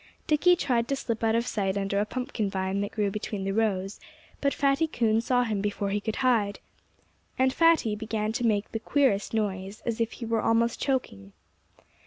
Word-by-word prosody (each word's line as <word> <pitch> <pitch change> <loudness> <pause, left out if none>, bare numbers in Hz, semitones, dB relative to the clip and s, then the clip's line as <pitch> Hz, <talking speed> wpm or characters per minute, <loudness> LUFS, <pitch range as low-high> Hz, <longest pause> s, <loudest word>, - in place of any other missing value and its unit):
Dickie 335 +4 +4
tried 245 -8 0
to 275 - 0
slip 230 -4 -3
out 225 0 +3
of 235 +1 +1
sight 195 -4 -1
under 200 0 0
a 210 - 0
pumpkin 245 -5 -3
vine 190 0 -1
that 205 +1 -3
grew 205 -2 0
between 210 -1 -4
the 195 - -1
rows; 200 -2 -1 0.4
but 280 - +2
Fatty 275 +4 +2
Coon 225 -6 +1
saw 245 +1 +2
him 215 -4 -1
before 205 -1 -2
he 205 - 0
could 215 +1 -3
hide. 215 -5 +2 0.8
And 260 0 +3
Fatty 330 -10 +3
began 215 0 -2
to 240 - -3
make 215 -3 +1
the 225 - -3
queerest 225 -4 +1
noise, 195 -1 -3
as 230 -1 -1
if 230 - -1
he 235 - -7
were 230 0 0
almost 230 +1 +1
choking. 100 - -2
220 Hz, 195 wpm, -27 LUFS, 200-245 Hz, 0.8 s, Dickie